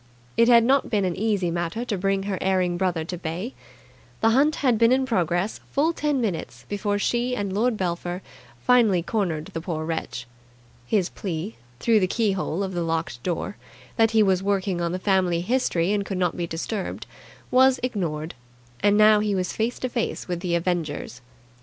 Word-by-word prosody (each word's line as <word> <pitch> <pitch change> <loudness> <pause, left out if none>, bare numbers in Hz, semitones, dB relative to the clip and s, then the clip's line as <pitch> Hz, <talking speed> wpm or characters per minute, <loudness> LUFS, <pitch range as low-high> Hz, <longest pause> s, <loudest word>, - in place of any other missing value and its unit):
It 230 +1 +5
had 235 -1 +7
not 270 +3 +3
been 205 -3 +1
an 180 -2 -1
easy 200 -5 0
matter 175 +7 -2
to 225 - -1
bring 195 +1 0
her 195 -2 -3
erring 185 -2 +1
brother 175 -3 -1
to 180 +2 -5
bay. 180 +9 -4 0.7
The 225 - +4
hunt 285 +6 +3
had 250 -6 +1
been 230 +1 +5
in 260 +1 +3
progress 180 -4 0
full 310 +4 +1
ten 295 -3 0
minutes 165 - -3
before 205 0 -1
she 240 +4 0
and 200 -4 -3
Lord 225 +3 +1
Belpher 175 0 -3 0.4
finally 225 -8 +4
cornered 170 -7 -2
the 165 - -3
poor 160 -2 -3
wretch. 160 -6 -4 0.6
His 190 - +1
plea, 185 +2 -5 0.2
through 225 - +4
the 185 - +2
keyhole 195 -4 0
of 190 -1 -4
the 175 - -1
locked 165 -6 -2
door, 180 +6 -3 0.4
that 225 -1 +4
he 220 -1 +4
was 190 -2 +2
working 195 -2 0
on 170 -1 0
the 180 - -1
family 185 -3 +1
history 190 -5 +1
and 205 -1 0
could 195 -1 -4
not 180 -2 0
be 170 -1 -3
disturbed, 180 +5 -4 0.5
was 260 +1 +5
ignored; 170 -10 -2 0.5
and 205 0 +3
now 215 0 +6
he 210 -1 0
was 185 -1 -1
face 225 +2 -1
to 255 - -2
face 235 -2 -3
with 175 -2 -2
the 175 -1 -1
avengers. 165 -8 -2
195 Hz, 185 wpm, -24 LUFS, 175-225 Hz, 0.7 s, had